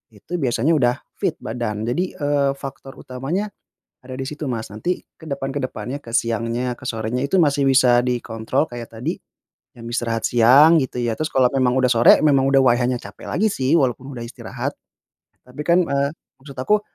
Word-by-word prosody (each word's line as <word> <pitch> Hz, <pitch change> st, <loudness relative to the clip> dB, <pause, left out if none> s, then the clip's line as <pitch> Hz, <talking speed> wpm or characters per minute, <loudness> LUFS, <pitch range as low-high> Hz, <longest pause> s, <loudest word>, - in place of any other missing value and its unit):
itu 170 Hz, -, -6 dB
biasanya 135 Hz, +4 st, +1 dB
udah 125 Hz, -2 st, +2 dB, 0.2 s
fit -, -, 0 dB
badan. 110 Hz, -2 st, -3 dB
Jadi, 175 Hz, +11 st, -2 dB
eee, 145 Hz, -2 st, +1 dB
faktor 135 Hz, -1 st, -9 dB
utamanya 160 Hz, +12 st, -4 dB, 0.5 s
ada 130 Hz, -, -8 dB
di 130 Hz, -, -5 dB
situ, 150 Hz, +1 st, -6 dB
Mas. 115 Hz, -6 st, -3 dB
Nanti 110 Hz, -, -3 dB, 0.2 s
ke 160 Hz, -, -14 dB
depan 140 Hz, -2 st, -4 dB
ke 140 Hz, -, -4 dB
depannya, 125 Hz, +2 st, -4 dB
ke 115 Hz, -5 st, -12 dB
siangnya, 115 Hz, +2 st, -1 dB
ke 130 Hz, -, -13 dB
sorenya 115 Hz, +3 st, -2 dB
itu 180 Hz, +5 st, +2 dB
masih 140 Hz, -2 st, +2 dB
bisa 130 Hz, -2 st, +5 dB
dikontrol 125 Hz, +3 st, -1 dB
kayak 120 Hz, -1 st, -8 dB
tadi 110 Hz, +2 st, -3 dB, 0.5 s
jam 115 Hz, -1 st, -11 dB
istirahat 115 Hz, -1 st, -1 dB
siang 130 Hz, +8 st, +6 dB
gitu 125 Hz, -, -5 dB
ya. 120 Hz, -2 st, -1 dB
Terus 155 Hz, 0 st, -3 dB
kalau 130 Hz, -1 st, +4 dB
memang 130 Hz, -2 st, +2 dB
udah 130 Hz, -1 st, +3 dB
sore 115 Hz, 0 st, +6 dB
memang 140 Hz, -3 st, +3 dB
udah 135 Hz, -, +5 dB
waihanya 125 Hz, 0 st, +2 dB
capek -, -, -10 dB
lagi 215 Hz, +4 st, +2 dB
sih 155 Hz, -4 st, +2 dB
walaupun 130 Hz, +1 st, -1 dB
udah 120 Hz, -2 st, -6 dB
istirahat. -, -, -6 dB, 0.7 s
Tapi 125 Hz, +4 st, -8 dB
kan, 170 Hz, +2 st, +3 dB
eee, 140 Hz, -1 st, 0 dB, 0.3 s
maksud 135 Hz, -2 st, -12 dB
aku 210 Hz, +11 st, +2 dB
130 Hz, 185 wpm, -21 LUFS, 120-145 Hz, 0.7 s, siang